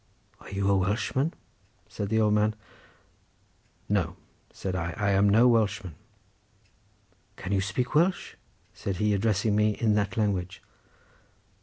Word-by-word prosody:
"Are - - -13
you 100 0 -1
a 100 - +4
Welshman?" 110 - 0 0.6
said 100 - -5
the 110 +1 +2
old 105 -1 +3
man. 105 +1 +2 1.3
"No," 95 -4 0 0.4
said 95 -1 -5
I, 85 -2 -3
"I 105 -2 +1
am 100 +1 +4
no 115 +5 +5
Welshman." 100 -6 +1 1.4
"Can 95 - -6
you 100 -1 +2
speak 105 +7 -2
Welsh?" 175 +5 +1 0.4
said 100 - -4
he, 105 +2 +1
addressing 105 0 +1
me 105 0 +3
in 110 -2 +1
that 100 -1 -1
language. 95 -4 -1
105 Hz, 135 wpm, -27 LUFS, 95-110 Hz, 1.4 s, no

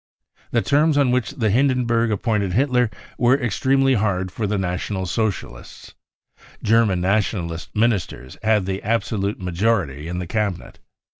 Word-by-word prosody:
The 115 - +1
terms 150 +1 +3
on 140 -3 +3
which 125 -2 0
Hindenburg* 120 0 +1
appointed 105 -2 0
Hitler 125 -2 +2 0.3
were 125 +3 +4
extremely 135 +3 +2
hafrd 100 -5 0
for 105 +1 -3
the 105 +1 -1
National 95 +1 -2
Socialists. 95 - -4 0.7
German 110 -4 +3
Nationalist 90 -4 -1
ministers 105 - -1
had 105 -3 +2
the 95 0 -3
absolute 105 -2 -1
majority 90 -5 -1
in 90 +1 -4
the 90 - -3
Cabinet. 100 -1 -3
105 Hz, 130 wpm, -21 LUFS, 95-120 Hz, 0.7 s, were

